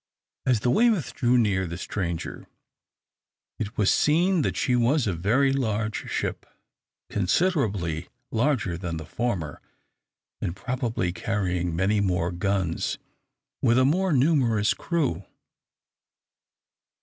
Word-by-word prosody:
As 120 -5 +3
the 120 - +2
"Weymouth" 220 - +2
drew 125 0 +2
near 100 -5 +2
the 85 +1 -5
stranger 85 -3 -4 1.1
it 110 +2 -4
was 105 -2 +4
seen 175 +4 +3
that - - -1
she 125 - +1
was 125 +4 +2
a 100 - 0
very 115 +11 +2
large 110 -5 -2
ship, - - -3 0.6
considerably 100 - 0 0.2
larger 115 - 0
than 85 -3 -4
the 80 - -7
former, 90 - -3 0.8
and 85 - -2
probably 115 -5 -2
carrying 90 -5 -1
many 100 +5 +2
more 90 -3 0
guns, 95 -2 -1 0.6
with 120 +1 +3
a 130 - +5
more 185 +6 +2
numerous 125 -7 +3
crew. 140 - -1
110 Hz, 115 wpm, -26 LUFS, 90-130 Hz, 1.1 s, a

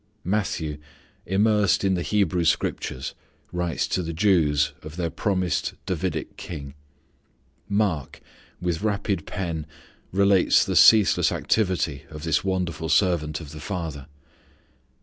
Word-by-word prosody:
Matthew, 85 -7 -1 0.5
immersed 105 +2 +3
in 95 -1 +2
the 90 - 0
Hebrew 90 -3 +1
Scriptures, 65 -4 -1 0.4
writes 90 -2 -1
to - - 0
the 85 -1 -4
Jews 80 -6 +2
of 75 0 -9
their 85 -2 -2
promised 95 -4 -1
Davidic 85 -3 -3
King; 70 -5 -7 1.0
Mark, 100 - -1 0.4
with 90 -1 -2
rapid 100 -2 -1
pen, 85 -5 -4 0.4
relates 100 -1 +4
the - - -2
ceaseless 110 -4 +6
activity 85 -9 0
of 75 -1 -9
this 80 -3 +1
wonderful 90 -4 -2
servant 75 -4 +2
of 75 -3 -10
the 75 - -9
Father. 80 -7 -5
90 Hz, 120 wpm, -24 LUFS, 80-95 Hz, 1.0 s, ceaseless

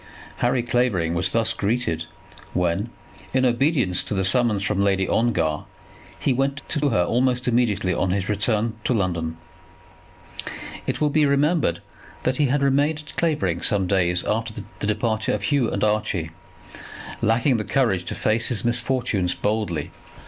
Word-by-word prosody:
Harry 120 0 +1
Clavering 120 -9 +1
was 90 +1 +1
thus 115 +1 +1
greeted 100 -8 -1 0.5
when 90 +5 0 0.5
in 130 0 +3
obedience 125 - +1
to - - -3
the 95 -1 0
summons 105 -1 +2
from 100 -1 0
Lady 95 -1 +2
Ongar, 85 -10 +1 0.5
he 135 - +1
went 135 +2 -1
to 150 -2 +1
her 90 -8 +2
almost 125 +5 +1
immediately 110 -6 +1
on 90 - 0
his 95 +1 -1
return 105 +2 +1
to 125 - +2
London. 85 -5 -1 1.5
It - - -2
will 150 -1 +2
be 150 0 +3
remembered 140 - +1 0.4
that 130 0 0
he 150 - +3
had 140 +2 +1
remained 145 +3 +2
at - - -9
Clavering 95 - 0
some 100 -2 +2
days 90 -2 +1
after 110 0 -2 0.2
the - - -2
departure 110 0 0
of 105 - -2
Hugh 125 +2 +2
and - - -2
Archie, 105 -6 0 0.9
lacking 115 +4 +2
the 105 - -2
courage 115 -8 +1
to - - -2
face 110 +1 +1
his 120 -2 0
misfortunes 120 -6 0
boldly. 105 -8 -2
110 Hz, 155 wpm, -23 LUFS, 95-125 Hz, 1.5 s, in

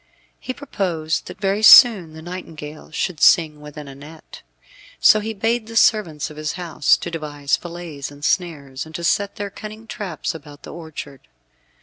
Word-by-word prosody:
He - - -5
purposed 180 - -3
that - - -10
very 195 +1 0
soon 215 -7 +8
the 160 0 -11
nightingale 160 -4 -9
should 160 +1 -3
sing 155 -3 +4
within 150 0 -10
a 135 - -9
net. 150 +4 -13 0.6
So 215 - +6
he 220 +1 -4
bade 225 +2 -1
the 230 - -9
servants 170 -10 +2
of 150 - -13
his 155 0 -3
house 165 -3 +2
to 170 - -6
devise 145 -3 -1
fillets 170 -5 -7
and 145 +1 -8
snares, 145 -7 -2
and 160 0 -12
to 170 - -5
set 200 +4 0
their 205 -1 -5
cunning 215 +2 -10
traps 200 -8 -5
about 145 -2 -12
the - - -9
orchard. 155 -5 -9
165 Hz, 175 wpm, -21 LUFS, 150-200 Hz, 0.6 s, soon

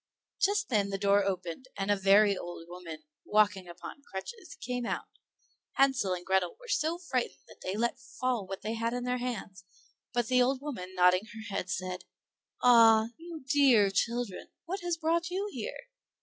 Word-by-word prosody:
Just 415 +1 +2
then 205 -4 +2
the 195 - -2
door 200 0 +3
opened, 185 +4 -3
and 195 +1 0
a - - +4
very 200 +1 +5
old 175 -2 -7
woman, 170 -3 -9 0.2
walking 205 -3 +2
upon 175 - -9
crutches, 365 - -7
came 245 +1 -3
out. 235 - -2 0.7
Hansel 265 -9 +2
and 180 0 -9
Grethel 190 -1 +1
were - - -14
so 325 -5 0
frightened 275 -9 -3
that - - -17
they 185 - -3
let 235 +2 0
fall 250 -6 -2
what 195 0 -6
they 215 +1 -2
had 230 +1 -1
in 245 - -3
their 250 0 -1
hands; 210 -6 -5 0.5
but 240 -1 0
the 250 +2 +3
old 260 +2 +2
woman, 210 -11 -6
nodding 180 +2 +4
her 220 -2 -7
head, 180 - -2
said, 185 -1 -4 0.6
"Ah, 225 -2 +7
you 330 -4 -9
dear 260 -8 +5
children, 230 +1 -1 0.2
what 375 +3 -3
has 350 -2 -2
brought 330 +1 0
you 385 +3 -2
here? - - -7
225 Hz, 180 wpm, -30 LUFS, 190-265 Hz, 0.7 s, Ah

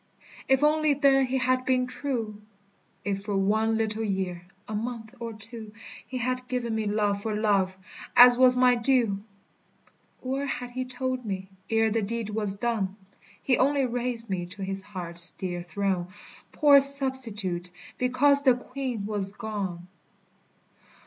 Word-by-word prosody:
if 265 +1 +2
only 305 -1 +2
then 270 -2 +3
he 260 +1 -1
had 255 0 0
been 255 -1 +1
true! 240 -5 -4 0.6
If 200 -1 -3
for 205 -2 -2
one 220 +3 +1
little 220 0 -2
year, 185 -4 -4 0.2
a 215 - -7
month 225 +1 -5
or 230 -1 -5
two, 220 0 -10 0.3
He 260 - -6
had 255 +1 -3
given 245 -3 -3
me 220 -1 -2
love 205 -1 -1
for 215 0 -3
love, 200 -3 0 0.4
as 245 0 +8
was 250 0 +5
my 250 0 +4
due! 235 -5 +1 1.0
Or 270 +2 -3
had 245 -2 -5
he 255 +1 -4
told 255 0 -4
me, 190 -3 -6 0.2
ere 225 0 +1
the 225 +1 0
deed 220 +1 -4
was 210 -2 +1
done, 205 -3 -2 0.5
He 255 - +1
only 275 0 +2
raised 245 -1 -2
me 180 -3 -4
to 195 +2 -9
his 195 0 +2
heart's 175 -3 +4
dear 175 -2 -5
throne 180 +1 -3 0.4
Poor 285 -2 +5
substitute 240 -10 +4 0.3
because 275 +3 +4
the 260 -3 +4
queen 250 -4 -5
was 205 -2 -2
gone! 195 -5 -6
225 Hz, 150 wpm, -26 LUFS, 200-255 Hz, 1.0 s, as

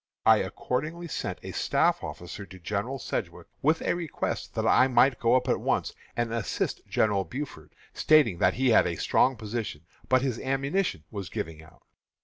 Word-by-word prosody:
I - - +7
accordingly 155 +7 -3
sent - - -3
a - - -6
staff - - +1
officer 90 +4 -7
to 95 - -12
General 105 +8 -3
Sedgwick - - -4 0.2
with 155 +3 +2
a - - +1
request 170 -4 -4
that - - -1
I 130 - +5
might 130 0 +4
go 115 +1 +3
up 130 - +1
at - - +2
once - - 0 0.2
and 120 -1 0
assist 115 -3 -2
General 100 -3 +2
Buford, 110 - -7 0.2
stating 145 - +4
that 90 - +3
he 130 0 +2
had 110 - +5
a 85 - -2
strong 130 +9 +2
position, 105 -8 -5 0.2
but 130 0 +4
his 125 -4 -1
ammunition 135 - -1
was 100 -5 -5
giving 80 -1 -5
out. 80 - -19
120 Hz, 175 wpm, -27 LUFS, 100-135 Hz, 0.2 s, I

